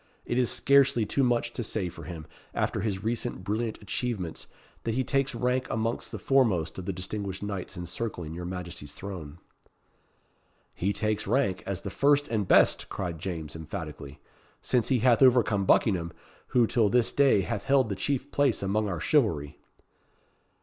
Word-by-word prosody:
It 120 - 0
is 125 - +2
scarcely 140 -4 +4
too 140 - 0
much 120 -2 +1
to - - -3
say 105 -3 -2
for 90 - -9
him, 80 -3 -7 0.3
after - - 0
his 100 -2 -2
recent 115 -3 -2
brilliant 110 +3 -2
achievements, 105 -6 -3 0.4
that 115 -1 -1
he 130 - +1
takes 135 +1 0
rank 125 +2 0
amongst 115 +1 -2
the - - -4
foremost 100 - +1
of 90 - -7
the - - 0
distinguished 95 +1 -5
knights 100 -4 -5
encircling 90 -2 -5
your 85 +1 -6
Majesty's 85 -5 -6
throne." 85 -6 -7 1.4
"He 95 +3 -1
takes 110 +1 -1
rank 115 -9 +1
as 95 -2 -3
the - - -5
first 145 +1 +3
and 105 -4 -1
best," - - +4
cried 85 -4 -4
James, 80 -4 -5
emphatically; 75 -2 -7 0.4
"since 120 -3 +1
he 130 - +3
hath 120 0 +4
overcome 120 -6 +4
Buckingham, 90 -5 +3 0.4
who 120 -2 +3
till 110 -2 +2
this 120 +2 +3
day 140 -8 +4
hath 100 +3 -3
held 135 -4 +3
the 100 - -2
chief 135 +7 -2
place 140 -7 +2
among 105 +2 0
our 90 -4 -3
chivalry." 85 - +1
105 Hz, 165 wpm, -28 LUFS, 90-125 Hz, 1.4 s, scarcely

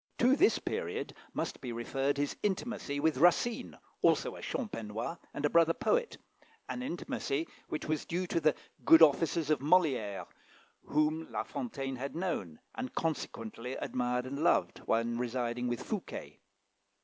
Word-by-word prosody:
To 255 +3 +5
this 390 +8 +5
period - - -3 0.2
must - - -3
be 125 - -4
referred 135 +4 -1
his 145 0 -1
intimacy 200 -7 -1
with 155 -1 +2
Racine, 180 +8 +3 0.2
also - - +3
a - - -9
"Champenois," 115 - -4
and 145 - -2
a - - +4
brother 165 0 +5
poet 485 -1 +1 0.5
an 250 - -4
intimacy 165 - -2 0.2
which 155 - -3
was 155 0 -1
due 180 +2 -1
to 170 - 0
the 155 -2 +3 0.3
good 165 0 +9
offices 160 +1 +4
of 150 - +3
Molière, 140 - +2 0.6
whom 155 +2 +1
La - - -1
Fontaine 135 - -4
had 135 +3 -5
known, 160 - -2
and, 130 - -5
consequently 125 -6 -3
admired 125 0 -1
and 140 +4 -3
loved, - - +3
when 115 +1 +1
residing 125 0 -1
with 120 +1 -2
Fouquet. 210 -4 -5
150 Hz, 150 wpm, -32 LUFS, 125-170 Hz, 0.6 s, good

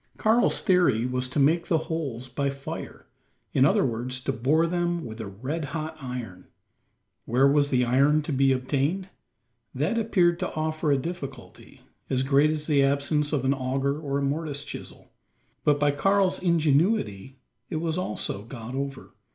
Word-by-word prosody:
Karl's 225 +3 +2
theory 175 - +3
was 125 0 -1
to 130 - -5
make 155 +5 +3
the 165 - +3
holes 145 -7 -4
by 140 +3 -1
fire 140 0 -7 0.5
in 130 - +5
other 140 - +3
words, 125 +1 -2
to 135 - -2
bore 145 +7 +2
them 175 -1 -1
with 110 -1 -7
a 110 - -5
red 130 +11 -4
hot 155 +1 -5
iron. 125 -8 -7 0.8
Where 130 +4 +3
was 145 0 +3
this 125 -2 +2
iron 140 +5 +3
to 150 - -4
be 135 0 +3
obtained? 140 +8 -1 0.7
That 230 - 0
appeared 175 -6 +2
to - - -3
offer 155 0 -1
a 140 - +4
difficulty, 140 -4 -8 0.3
as 130 -1 +1
great 140 +2 +4
as 155 -1 -2
the 145 -3 +3
absence 140 +2 +1
of 140 -4 0
an 135 - +3
auger 135 +2 -1
or 140 -3 -2
a 140 - -1
mortise 145 0 -2
chisel. - - -10 0.5
But 145 -1 +3
by 145 0 +3
Karl's 195 +5 +2
ingenuity 150 - +1 0.3
it - - -4
was 160 0 -1
also 105 - -3
got 115 +1 -8
over. 135 0 -5
140 Hz, 165 wpm, -26 LUFS, 130-160 Hz, 0.8 s, in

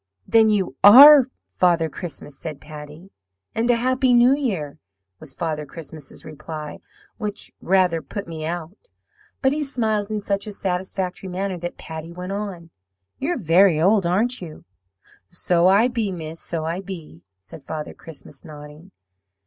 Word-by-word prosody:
"'Then 225 -1 +5
you 195 -9 0
ARE 270 +5 +10 0.3
Father 170 -3 +2
Christmas?' 150 -3 -8
said 150 0 -7
Patty. 150 +4 -11 0.4
"'And 225 +2 -1
a 240 - +5
happy 255 +1 +2
New 240 +2 +6
Year,' 190 - -3 0.4
was 135 -4 -7
Father 155 0 -3
Christmas's 155 0 -10
reply, 155 0 -8 0.4
which 210 -2 -5
rather 180 -3 +2
put 200 +4 -7
me 160 -2 -7
out. 170 +2 -5 0.7
But 265 +1 +3
he 305 - -2
smiled 220 -7 -1
in 215 -1 -2
such 200 0 -2
a 210 - -6
satisfactory 185 0 -4
manner 185 0 -3
that 175 +1 -6
Patty 160 +1 -8
went 180 +2 -7
on, 195 -5 -6 0.5
'You're 320 +5 -1
very 175 - +4
old, 190 +2 +3
aren't 225 +8 0
you?' 160 -4 -10 0.6
"'So 175 0 +1
I 200 +5 +5
be, 230 -5 -2
miss, 165 -2 -7
so 165 -2 -3
I 170 +4 -3
be,' 170 - -9 0.2
said 95 +9 -14
Father 155 -1 -5
Christmas, 160 -3 -12
nodding. 150 +2 -12
180 Hz, 150 wpm, -22 LUFS, 160-210 Hz, 0.7 s, ARE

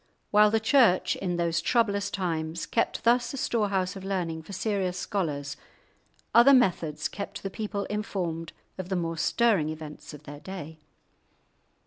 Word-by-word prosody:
While 210 0 +6
the 225 +1 +2
Church 225 -5 +4
in 180 -2 -2
those 170 -1 +1
troublous 205 -4 +1
times 165 -3 -2
kept 230 - -1
thus 245 +3 +2
a - - -6
storehouse 200 -7 0
of 195 - -8
learning 175 -4 -2
for 160 - -12
serious 195 -2 -1
scholars, 150 -9 -3 0.8
other 240 +4 +8
methods 165 - +1
kept 200 - -7
the 195 - -4
people 205 -1 -3
informed 175 -6 -3 0.3
of 185 -1 -5
the 190 - 0
more 165 -2 -1
stirring 200 -4 +2
events 155 -1 -8
of 150 - -14
their 145 -1 -9
day. 160 -1 -8
185 Hz, 150 wpm, -27 LUFS, 165-210 Hz, 0.8 s, other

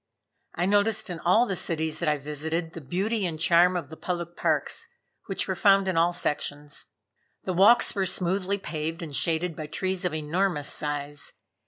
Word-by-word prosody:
I 175 - 0
noticed 205 0 +2
in 170 - -5
all 200 +9 +4
the 195 - -2
cities 160 -3 -2
that 170 - +1
I 150 - +2
visited 160 +3 -3
the 165 - -7
beauty 195 - -1
and 160 -2 -5
charm 175 +2 +4
of 160 -4 -6
the - - -7
public 175 0 -4
parks, - - -1 0.4
which - - -2
were - - -1
found 195 -2 +4
in 185 - 0
all 170 +1 +4
sections. 150 -3 -2 0.6
The 185 - -2
walks 200 +7 +5
were 195 -2 0
smoothly 190 +2 0
paved 165 -2 -4
and 150 -4 -6
shaded 165 +4 +1
by 155 0 -6
trees 185 +4 -2
of 180 - 0
enormous 155 0 0
size. 145 -1 -3
170 Hz, 180 wpm, -26 LUFS, 155-190 Hz, 0.6 s, walks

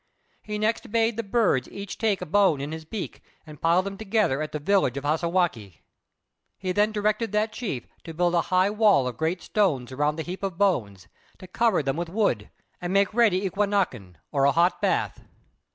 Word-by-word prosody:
He 210 0 -5
next 215 0 -1
bade 225 0 +2
the 230 - -1
birds 200 - +1
take - - -16
each 200 +1 -2
a - - -5
bone 190 -4 +3
in 140 +2 -4
his 160 0 -7
beak 200 +4 -6 0.2
and 155 -2 -13
pile 170 +3 +3
them 195 +1 -6
together 210 -10 +1
at 155 - -4
the - - -3
village 150 -4 +1
of 140 - -4
Hassagwākq'. 155 - 0 0.8
He 185 -1 -3
then 210 +3 +2
directed 215 +1 0
that 215 +1 +1
chief 195 - -4 0.2
to 165 - -7
build 175 +1 +1
a 170 - +3
high 185 +2 +3
wall 210 - +4
of 125 - -4
great 165 +2 -1
stones 140 - 0
around 145 +3 0
the 160 - -4
heap 180 +3 -6
of 195 -4 -3
bones, 110 - 0 0.3
to - - -11
cover 200 -2 +1
them 135 +1 -1
with 170 -1 -3
wood, 175 - 0 0.3
and 175 0 -3
make 200 +1 +2
ready 205 -5 +3
"eqūnāk'n," 185 - -1 0.2
or 140 -1 +2
a 140 - +5
hot 175 +2 +2
bath. - - 0
185 Hz, 200 wpm, -25 LUFS, 150-205 Hz, 0.8 s, a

